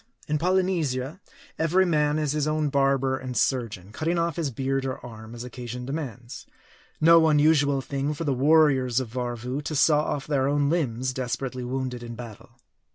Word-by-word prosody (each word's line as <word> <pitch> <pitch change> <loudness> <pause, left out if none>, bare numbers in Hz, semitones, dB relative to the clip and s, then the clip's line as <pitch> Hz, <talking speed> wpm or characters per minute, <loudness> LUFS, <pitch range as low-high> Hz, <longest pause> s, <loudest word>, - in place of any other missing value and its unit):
In 150 0 0
Polynesia, 170 -4 0 0.4
every 175 +4 +3
man 150 -3 +2
is 150 -2 0
his 150 0 0
own 155 -1 0
barber 135 -1 +1
and 125 -1 -5
surgeon, 110 -7 -1
cutting 165 +9 -1
off 170 -2 0
his 165 -4 -1
beard 135 +2 -2
or 130 -1 -3
arm, 110 -1 -10
as 120 - -7
occasion 125 0 -7
demands. 130 -4 -6 0.5
No 165 0 +6
unusual 145 -2 +3
thing, 140 +2 -2
for 165 - -4
the 145 -4 +1
warriors 135 -3 +4
of 130 -3 -4
Varvoo 125 +2 -3
to 155 +1 -4
saw 150 +1 +4
off 145 -2 -3
their 135 -3 +1
own 145 0 +1
limbs, 130 -6 -1
desperately 125 0 -3
wounded 125 -1 -3
in 120 -1 -7
battle. 115 -3 -10
135 Hz, 170 wpm, -25 LUFS, 125-155 Hz, 0.5 s, No